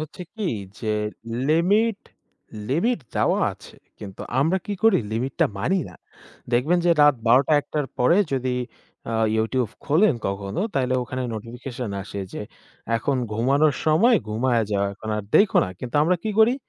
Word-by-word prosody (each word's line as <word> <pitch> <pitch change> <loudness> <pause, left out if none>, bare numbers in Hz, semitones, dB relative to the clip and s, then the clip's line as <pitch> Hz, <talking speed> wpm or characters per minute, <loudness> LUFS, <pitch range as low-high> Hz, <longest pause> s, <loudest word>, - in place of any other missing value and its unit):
হচ্ছে 155 +3 -7
কি 210 -5 -2 0.3
যে, 110 -1 -2 0.6
লিমিট, 200 +7 +3 0.7
লিমিট 180 - +1 0.2
দেওয়া - - +2
আছে। - - -15 0.2
কিন্তু 95 -2 -9 0.2
আমরা 165 +6 +2
কি 205 - -2
করি? 225 -4 +5
লিমিট 125 +4 -2
টা - - +6
মানি 180 - +1
না। - - -13 0.6
দেখবেন 145 +9 +3
যে 175 - +5
রাত 145 -1 +6
১২ 125 +4 +6
টা - - +3
১ 145 - -22
টার 150 -2 0
পরে 125 +8 +4 0.2
যদি 130 -1 -1 0.6
আ - - -1 0.2
YouTube 110 +1 0
খোলেন 160 +3 +3
কখনো, 100 - -4
তাইলে 130 -1 +1
ওখানে 130 +1 -4
নোটিফিকেশন 120 +1 -6
আসে 100 0 -6
যে, - - -5 0.5
"এখন 135 +4 -1 0.2
ঘুমানোর 135 +6 +2
সময়, 205 +11 +5
ঘুমায়ে 115 +1 +1
যাও। 100 0 +1
এখন 110 +2 -10
আর 105 - -3
দেইখো 205 0 +5
না।" - - -5
কিন্তু 125 +3 -4
আমরা 180 +4 +2
কি 220 - -2
করি? 225 +3 +6
135 Hz, 165 wpm, -23 LUFS, 115-175 Hz, 0.7 s, টা